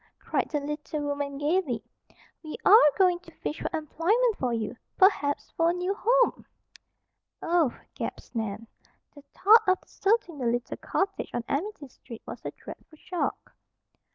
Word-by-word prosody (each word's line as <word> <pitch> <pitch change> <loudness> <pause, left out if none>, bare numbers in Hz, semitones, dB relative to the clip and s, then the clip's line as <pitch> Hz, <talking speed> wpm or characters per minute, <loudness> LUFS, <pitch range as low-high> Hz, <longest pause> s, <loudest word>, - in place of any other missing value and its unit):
cried - - -2
the 295 - -1
little 295 +1 -4
woman 285 -1 -3
gaily. 295 -4 0 0.6
"We 310 -2 -7
are 395 -8 +8
going 360 -2 +4
to 365 - -16
fish 305 - -5
for - - -2
employment 395 - +1
for 255 -8 -1
you, 230 +1 -3 0.2
perhaps 335 -7 +3
for 330 0 +2
a - - +2
new 360 +2 -1
home." - - +2 0.9
"Oh!" 330 -7 +1 0.2
gasped - - -6
Nan. 220 0 -3 0.5
The 285 - -14
thought 430 +5 +6
of 370 0 +4
deserting 390 -7 0
the 250 - -1
little 240 +1 -1
cottage 390 0 -2
on 240 - -1
Amity 315 0 -3
Street 240 -2 -12
was - - -8
a - - -3
dreadful 310 - -12
shock. 355 +3 -4
315 Hz, 155 wpm, -27 LUFS, 280-380 Hz, 0.9 s, are